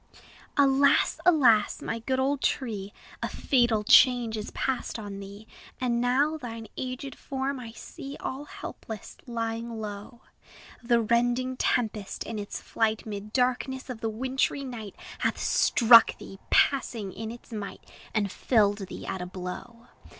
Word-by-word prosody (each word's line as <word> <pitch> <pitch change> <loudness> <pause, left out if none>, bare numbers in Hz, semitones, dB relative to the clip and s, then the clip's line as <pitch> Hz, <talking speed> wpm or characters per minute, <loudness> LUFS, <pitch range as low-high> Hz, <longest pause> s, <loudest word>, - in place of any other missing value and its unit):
Alas! 280 0 +4
alas! 245 -11 +5
my 230 - -3
good 260 +3 -1
old 275 +1 +1
tree, 210 -7 -1 0.3
A - - -1
fatal 240 -5 +2
change 240 0 +6
is 210 -1 -4
past 265 -2 -2
on 205 -2 -7
thee! 200 +2 -10 0.3
And 240 -2 +1
now 280 +6 +2
thine 230 -5 -7
aged 260 +1 -5
form 270 +1 -3
I 230 -2 -8
see, 275 +4 -9
All 270 +3 -5
helpless, 220 -7 -8
lying 230 -1 -3
low: 210 +3 -7 0.6
The 235 -1 +3
rending 245 +3 +1
tempest, 220 -5 -1
in 225 -2 -5
its 205 - -5
flight 220 -1 -1
'Mid 210 -1 -6
darkness 255 +2 0
of 225 -3 -8
the 225 - 0
wintry 260 +5 -1
night, 230 -6 -7 0.2
Hath - - 0
struck 230 -1 +6
thee, 195 - -11
passing 230 -8 +2
in 220 +2 -5
its 235 +1 -11
might, 205 -2 -6 0.3
And 205 -3 0
felled 205 -4 +2
thee - - -8
at 190 -1 -4
a 180 - -4
blow. 190 +6 -7
235 Hz, 145 wpm, -27 LUFS, 215-260 Hz, 0.6 s, change